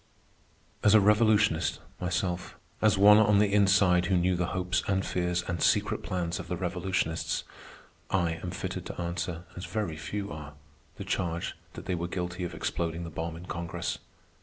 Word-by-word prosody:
As 105 - +5
a - - +9
revolutionist 105 -6 +3 0.2
myself, 90 0 -2 0.3
as 105 -2 +4
one 105 +2 +8
on 105 -1 +5
the 100 -1 +3
inside 95 -3 +4
who 95 -1 +3
knew 90 +1 +2
the 90 0 0
hopes 90 0 0
and 95 -1 +1
fears 90 0 -1
and 85 -2 -2
secret - - +2
plans 90 -1 -2
of 90 - -7
the 90 - -3
revolutionists, 90 -2 -1 0.7
I 90 -3 +1
am 90 - -4
fitted 85 - -5
to - - -7
answer, 85 0 -3
as 90 - -6
very 100 -8 -3
few 100 +4 -4
are, 75 -1 -8 0.4
the - - -5
charge 90 -3 -2 0.2
that - - -9
they 90 - -1
were 85 -1 -2
guilty 90 0 -4
of 85 - -4
exploding 85 0 -2
the 85 - -6
bomb 80 +1 -4
in 85 +2 -9
Congress. 85 -2 -4
90 Hz, 175 wpm, -29 LUFS, 85-100 Hz, 0.7 s, a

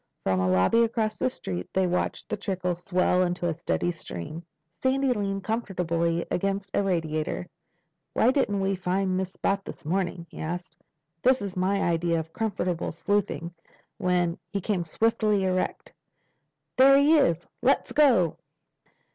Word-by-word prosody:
From 95 -1 +1
a 95 0 +1
lobby 95 - +4
across 220 -2 -1
the 255 - +2
street 90 - -6
they 190 0 +2
watched 180 0 -1
the - - -2
trickle 185 -3 -2
swell 180 0 +1
to 180 0 -3
a 165 - 0
steady 175 +1 -1
stream. 155 - -7 0.4
Sandy 265 0 +2
leaned 195 -3 -2
comfortably 170 -7 -1
against 195 +1 -1
a - - +2
radiator. 160 -4 -1 0.7
"Why 240 - +4
didn't 205 -8 +1
we 195 0 +1
find 185 +1 0
this 190 0 -3
spot 195 0 -1
this - - -10
morning?" 175 0 -1
he - - -10
asked. 175 +1 -5 0.5
"This 260 +1 +4
is 200 -2 -5
my 190 +2 +1
idea 170 0 +1
of 160 0 -7
comfortable 185 -6 -2
sleuthing. 190 -1 -1 0.5
When—" 180 -3 +1
He 200 - -2
came 195 -1 -1
swiftly 210 +3 +1
erect. 185 -1 -1 0.8
"There 275 +1 +8
he 300 +3 +5
is! 175 - +2 0.2
Let's 265 +3 +2
go." 245 - +4
185 Hz, 150 wpm, -26 LUFS, 170-205 Hz, 0.8 s, There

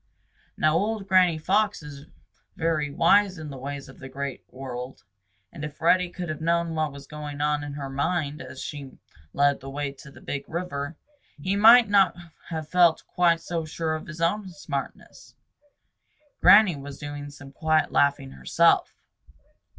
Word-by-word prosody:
Now 155 0 +3
old 205 +3 -1
Granny 180 -3 +4
Fox 195 +3 0
is 145 0 -10 0.5
very 160 -3 0
wise 185 +6 +3
in 155 -2 -7
the 135 - -8
ways 140 +1 -6
of 135 - -15
the 130 - -9
Great 140 0 -5
World, 130 -1 -8 0.5
and 150 - -8
if 150 -1 -7
Reddy 180 +2 +3
could 175 0 -6
have 155 0 -5
known 170 0 0
what 155 -2 -1
was 140 0 -11
going 150 -1 -8
on 150 0 0
in 145 -1 -6
her 140 -1 -5
mind 145 +2 -2
as 130 0 -10
she 140 -3 -8 0.3
led 140 0 +2
the 135 0 -9
way 140 0 -3
to 140 +1 -14
the - - -15
Big 140 -1 -6
River, 160 -3 -4 0.4
he 185 +7 -1
might 230 +3 +8
not 195 -4 +4 0.3
have 160 -3 -4
felt 175 -2 +3
quite 170 -2 +2
so 170 -3 -3
sure 160 0 -3
of 155 - -5
his 160 +1 -8
own 190 +4 0
smartness. 145 -4 -7 1.1
Granny 195 -1 +7
was 140 0 -9
doing 145 -1 -7
some 140 -1 -12
quiet 155 +2 +1
laughing 140 - +1
herself. 65 -1 +2
155 Hz, 165 wpm, -25 LUFS, 140-170 Hz, 1.1 s, might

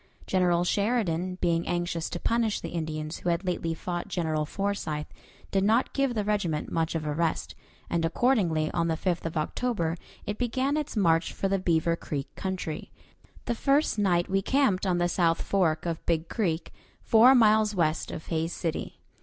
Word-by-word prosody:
General 175 -2 +2
Sheridan, 185 -3 0
being 170 -1 +1
anxious 175 -1 -1
to 175 - -4
punish 230 0 +1
the - - -6
Indians 155 -1 -4
who 180 - -2
had 170 +2 0
lately 165 -2 -1
fought 175 +1 -4
General 155 -3 -1
Forsyth, 185 -7 -2 0.5
did 195 -1 +2
not 225 +5 +2
give 275 -3 +1
the 210 - 0
regiment 195 -7 -1
much 165 0 0
of 155 -1 -2
a 150 - -1
rest, 165 +1 -1 0.3
and 170 -1 0
accordingly 170 -5 +2
on 170 -1 0
the 165 - +1
5th 175 -1 -1
of 165 - -4
October 170 0 -1 0.3
it 210 +1 -4
began 260 +3 0
its 300 -6 -3
march 165 -4 +2
for 195 - -1
the 195 0 +1
Beaver 170 -2 +2
Creek 140 -4 -5
country. 185 -5 -4 0.5
The - - 0
first 275 0 +2
night 175 -4 +2
we 195 +1 +1
camped 210 -5 +2
on 180 -2 +2
the 175 0 +2
south 170 -1 +1
fork 175 -5 +1
of 165 -2 -3
Big 165 -1 +1
Creek, 175 -7 -2 0.3
four 240 +4 +7
miles 215 -2 +4
west 160 -3 0
of 155 - -6
Hays 165 0 -2
City. 165 -3 -4
175 Hz, 180 wpm, -27 LUFS, 165-210 Hz, 0.5 s, four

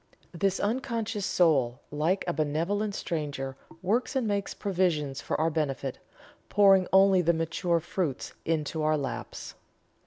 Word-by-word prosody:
This 195 +2 0
unconscious 225 -2 -1
soul, 135 -9 +2
like 160 +6 0
a 175 - -1
benevolent 170 +8 -1
stranger, 145 -5 -3 0.3
works 230 +8 0
and 255 -4 +1
makes 200 -1 -1
provisions 170 -8 0
for - - -2
our 160 +1 +2
benefit, 140 -4 -2 0.5
pouring 195 -3 +5
only 190 -1 +6
the 170 0 +3
mature 165 +1 0
fruits 165 -4 -3
into 160 -1 -1
our 155 0 +2
laps." 140 -2 -5
170 Hz, 130 wpm, -28 LUFS, 150-195 Hz, 0.5 s, only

